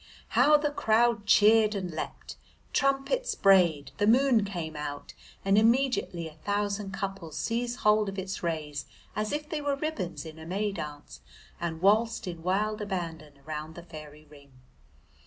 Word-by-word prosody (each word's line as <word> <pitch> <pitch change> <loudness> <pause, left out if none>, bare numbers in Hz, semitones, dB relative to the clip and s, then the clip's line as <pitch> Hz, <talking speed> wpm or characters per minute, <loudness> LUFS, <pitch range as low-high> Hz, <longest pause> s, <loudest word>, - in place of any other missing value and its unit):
How 300 0 +5
the 295 0 -1
crowd 225 -4 +2
cheered 215 0 +5
and 185 -3 -3
leapt! 155 - -6 0.4
Trumpets 275 - +1
brayed, 170 -8 +4
the 205 - +2
moon 245 -1 +4
came 170 -6 -5
out, 145 -1 -6 0.3
and 195 +1 +5
immediately 230 -7 +1
a 160 - -11
thousand 205 0 -1
couples 195 -4 -5
seized 240 +1 -2
hold 210 -1 +3
of 195 - -7
its 190 0 -4
rays 155 -4 -3 0.3
as 215 +1 -1
if 300 0 -3
they 305 -1 -3
were 285 -1 0
ribbons 275 - -4
in 160 0 -10
a 160 - -9
May 200 +4 -1
dance 145 - -8 0.4
and 170 0 -4
waltzed 220 +4 +3
in 170 -2 -6
wild 210 +5 0
abandon 165 -7 -5
round 155 +1 -6
the 175 - -9
fairy 155 -2 -11
ring. 140 -2 -18
195 Hz, 155 wpm, -28 LUFS, 160-225 Hz, 0.4 s, How